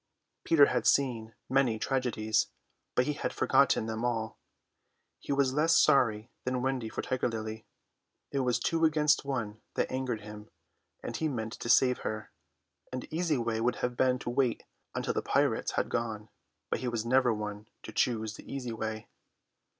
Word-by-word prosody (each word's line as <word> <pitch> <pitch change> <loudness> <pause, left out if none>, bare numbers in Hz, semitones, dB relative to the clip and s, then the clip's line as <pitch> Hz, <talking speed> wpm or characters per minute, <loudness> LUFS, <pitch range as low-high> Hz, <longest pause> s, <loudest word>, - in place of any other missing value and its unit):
Peter 155 -4 +6
had - - 0
seen 115 -5 +1
many 130 -4 +2
tragedies, 110 -4 0 0.5
but 125 - +3
he 150 - 0
had - - -3
forgotten 140 -5 +3
them 110 +1 -3
all. 115 -2 -1 0.8
He - - -6
was 140 -2 +2
less 160 +3 +4
sorry 115 -7 +3
than 125 0 -1
Wendy 130 -4 -1
for - - -4
Tiger 130 -1 0
Lily: 110 -1 -5 0.6
it 140 - 0
was 125 -2 +2
two 165 0 0
against 150 -2 +3
one 110 -6 -3
that - - 0
angered 130 -4 -2
him, 105 0 -10 0.5
and - - -4
he 160 - 0
meant 115 -5 -3
to 120 - -6
save 125 0 +5
her. 110 0 -5 0.6
An 130 0 -4
easy 165 -3 +1
way 115 -2 -1
would 125 +2 +1
have 125 0 -3
been 130 0 +3
to 120 - -4
wait 125 -2 +1 0.3
until - - -1
the - - 0
pirates - - +1
had - - 0
gone, 110 -2 -3 0.4
but - - 0
he 130 - -3
was 115 -2 -2
never 130 0 +4
one 105 -1 -4 0.2
to - - -8
choose 110 -3 0
the - - -11
easy 130 -3 -4
way. 110 -1 -4
125 Hz, 175 wpm, -30 LUFS, 110-135 Hz, 0.8 s, Peter